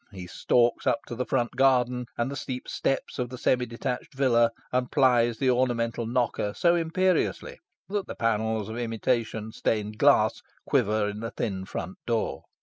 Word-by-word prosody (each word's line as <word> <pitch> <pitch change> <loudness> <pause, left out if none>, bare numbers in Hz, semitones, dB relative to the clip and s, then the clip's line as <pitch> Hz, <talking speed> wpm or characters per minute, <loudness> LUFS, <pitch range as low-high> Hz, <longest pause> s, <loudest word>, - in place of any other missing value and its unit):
He 95 -3 -8
stalks 120 +7 +1
up - - +2
the 120 +1 -4
front 120 -2 0
garden 125 -2 +2
and 120 +3 -1
the - - -4
steep 130 -3 -5
steps 135 - -2
of 125 -1 -1
the 125 - -7
semi 125 0 +1
detached 125 +3 -5
villa, 120 -4 +4 0.2
and 125 0 0
plies 120 -4 +3
the 130 0 +2
ornamental 120 -2 0
knocker 120 -4 -1
so 170 -1 +3
imperiously 185 - 0 0.3
that 200 -1 -2
the - - -6
panels 110 -2 0
of 110 +2 -5
imitation 115 -1 -1
stained 105 -1 -2
glass - - +4 0.2
quiver 105 0 +2
in 105 0 -5
the 115 +1 -4
thin 95 -5 -3
front 95 -1 -6
door. 115 -2 -1
120 Hz, 165 wpm, -27 LUFS, 110-130 Hz, 0.3 s, villa